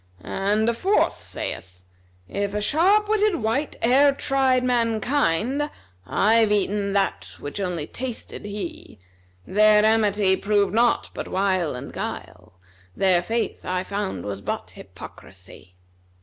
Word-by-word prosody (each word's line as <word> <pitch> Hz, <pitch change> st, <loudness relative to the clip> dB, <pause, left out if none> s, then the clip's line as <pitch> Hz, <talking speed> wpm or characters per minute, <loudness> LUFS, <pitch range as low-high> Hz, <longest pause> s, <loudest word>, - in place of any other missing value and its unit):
And 205 Hz, +3 st, 0 dB
a 235 Hz, -, +3 dB
fourth 385 Hz, -, +1 dB
saith, 90 Hz, -1 st, -7 dB, 0.4 s
'If 200 Hz, -, -3 dB
a -, -, 0 dB
sharp 375 Hz, -, +3 dB
witted 425 Hz, -2 st, +2 dB
wight 265 Hz, +2 st, -1 dB
e'er 275 Hz, +4 st, +5 dB
tried 265 Hz, -2 st, +1 dB
mankind, 245 Hz, -, +1 dB, 0.2 s
* 90 Hz, +1 st, -32 dB
I've 220 Hz, 0 st, +3 dB
eaten 200 Hz, 0 st, 0 dB
that 200 Hz, -1 st, -1 dB
which 145 Hz, +7 st, -7 dB
only 180 Hz, -6 st, -2 dB
tasted 245 Hz, +6 st, -6 dB
he:[FN#257] 95 Hz, -, -10 dB
Their 210 Hz, +1 st, +5 dB
amity 210 Hz, -3 st, +3 dB
proved 200 Hz, -2 st, +1 dB
naught 235 Hz, +2 st, +2 dB
but -, -, -6 dB
wile 185 Hz, -6 st, 0 dB
and 130 Hz, +3 st, -8 dB
guile, -, -, -7 dB, 0.2 s
* 95 Hz, 0 st, -30 dB
Their 185 Hz, -3 st, +3 dB
faith 230 Hz, +6 st, -3 dB
I 185 Hz, 0 st, -2 dB
found 200 Hz, 0 st, -4 dB
was 100 Hz, -1 st, -5 dB
but -, -, -4 dB
hypocrisy.'" 90 Hz, -1 st, -13 dB
205 Hz, 135 wpm, -23 LUFS, 180-240 Hz, 0.4 s, e'er